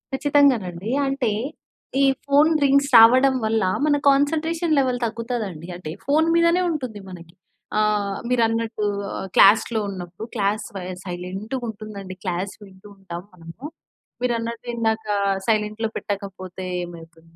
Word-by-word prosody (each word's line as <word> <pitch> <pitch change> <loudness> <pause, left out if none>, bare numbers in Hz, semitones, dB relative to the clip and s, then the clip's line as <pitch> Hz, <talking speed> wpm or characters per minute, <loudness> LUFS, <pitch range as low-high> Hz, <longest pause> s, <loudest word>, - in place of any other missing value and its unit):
ఖచ్చితంగానండి. 250 -10 +2 0.2
అంటే 270 -4 0 0.7
ఈ - - +5 0.2
ఫోన్ 290 +3 +4
రింగ్స్ 280 0 +3
రావడం 255 +4 +7
వల్ల, 220 -1 +1 0.2
మన 300 -1 +3
కాన్సన్‌ట్రేషన్ 320 +4 +1
లెవెల్ 255 -2 +1
తగ్గుతుందండి. 225 -8 -4
అంటే 175 -3 -8
ఫోను 310 +4 +2
మీదనే 335 +1 +4
ఉంటుంది. 255 -9 -4
మనకి 170 -2 -11 0.5
ఆహ్, 210 -2 +1
మీరన్నట్టు 225 -2 0 0.3
ఆహ్, - - -5
క్లాస్‌లో 220 +3 +5
ఉన్నప్పుడు, 185 +1 -7
క్లాస్ 210 0 0
స - - -23 0.3
సైలెంటుగుంటుందండి 200 +2 -6
క్లాస్ 185 +1 -3
వింటూ 190 0 -15
ఉంటాం 175 -3 -7
మనము. 170 +6 -13 0.6
మీరన్నట్టు 235 -1 -2
ఇందాక 220 -1 0 0.4
సైలెంట్‌లో 215 0 0
పెట్టకపోతే 190 -2 -6 0.2
ఏమవుతుంది, 165 -1 -12
220 Hz, 115 wpm, -22 LUFS, 190-260 Hz, 0.7 s, రావడం